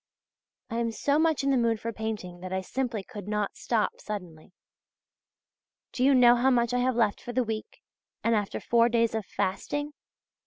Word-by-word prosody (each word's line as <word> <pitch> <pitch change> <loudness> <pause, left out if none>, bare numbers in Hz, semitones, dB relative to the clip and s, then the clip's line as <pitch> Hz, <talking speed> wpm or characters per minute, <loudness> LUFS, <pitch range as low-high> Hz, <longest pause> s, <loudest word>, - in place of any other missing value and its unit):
I 230 - -2
am 235 -1 0
so 285 +6 +1
much 320 -3 +2
in 275 - +2
the 270 - +3
mood 230 -2 +1
for 230 +1 -4
painting 215 -5 -5
that 185 +1 -7
I 190 0 -1
simply 235 +1 -3
could 205 -3 -9
not 210 -1 -1
stop 225 -3 -1
suddenly. 180 -6 -7 1.4
Do 250 - -1
you 275 +1 +5
know 245 -1 +7
how 250 +2 +3
much 240 -2 +2
I 250 - +2
have 255 0 +1
left 220 -4 +1
for 245 - -7
the 255 +1 +2
week, 220 -1 -6 0.4
and 230 - +2
after 205 -2 -1
four 235 0 +3
days 230 -1 +2
of 220 -3 -3
fasting? 290 +10 -2
230 Hz, 190 wpm, -28 LUFS, 210-250 Hz, 1.4 s, know